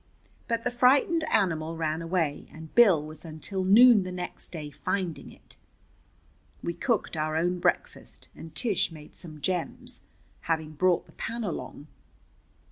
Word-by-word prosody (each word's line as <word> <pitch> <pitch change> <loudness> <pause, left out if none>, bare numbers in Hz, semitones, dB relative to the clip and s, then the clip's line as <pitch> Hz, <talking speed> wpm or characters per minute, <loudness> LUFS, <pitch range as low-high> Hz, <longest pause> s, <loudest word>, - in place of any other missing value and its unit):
But 230 -1 -1
the 245 - -1
frightened 275 +7 +3
animal 165 - 0
ran 160 0 -1
away, 165 -4 -1
and 160 0 -11
Bill 190 -11 +5
was 155 +1 -10
until 170 +4 -4
noon 220 +3 +7
the 185 0 -5
next 180 -1 -6
day 150 -4 -7
finding 180 +2 -3
it. - - -19 1.1
We 170 - -2
cooked 230 -4 -1
our 155 0 -1
own 175 +2 0
breakfast, - - -2
and 160 - -11
Tish 215 -8 0
made 155 -2 -12
some 155 -3 -10
gems, 180 0 -3 0.4
having 160 -2 -2
brought 175 +3 +1
the - - -19
pan 230 0 -5
along. 170 -6 -5
175 Hz, 145 wpm, -27 LUFS, 160-210 Hz, 1.1 s, noon